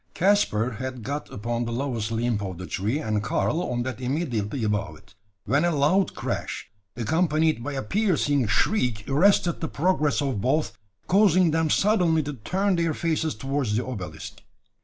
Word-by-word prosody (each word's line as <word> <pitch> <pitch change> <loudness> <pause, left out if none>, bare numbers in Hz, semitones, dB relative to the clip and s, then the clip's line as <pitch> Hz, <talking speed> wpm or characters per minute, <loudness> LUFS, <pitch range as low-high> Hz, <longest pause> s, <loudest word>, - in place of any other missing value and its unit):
Caspar 165 - +2
had 130 -2 -5
got 145 +4 -4
upon 120 +3 -2
the 115 - -4
lowest 115 -3 -2
limb 115 -1 0
of 95 -3 -5
the 95 - -6
tree, 105 +9 -1
and 110 -9 -1
Karl 150 - 0
on 120 -6 -2
that 130 0 -5
immediately 125 -4 -2
above 105 -2 -1
it, - - -22 0.3
when 140 +8 +2
a 175 - +3
loud 165 +5 +2
crash, - - -4 0.2
accompanied 155 +2 +1
by 145 +2 -4
a 135 - -3
piercing 145 - +1
shriek, 110 - +1
arrested 170 +4 +3
the 160 - -1
progress 155 -2 +1
of 135 -8 -1
both, 145 +6 0 0.3
causing 185 -3 +4
them 160 0 +1
suddenly 175 -5 +3
to 145 +1 -4
turn 185 - 0
their 165 -2 0
faces 160 -1 -1
towards 135 -2 -1
the 120 - -1
obelisk. 105 -9 -7
140 Hz, 165 wpm, -25 LUFS, 115-165 Hz, 0.3 s, causing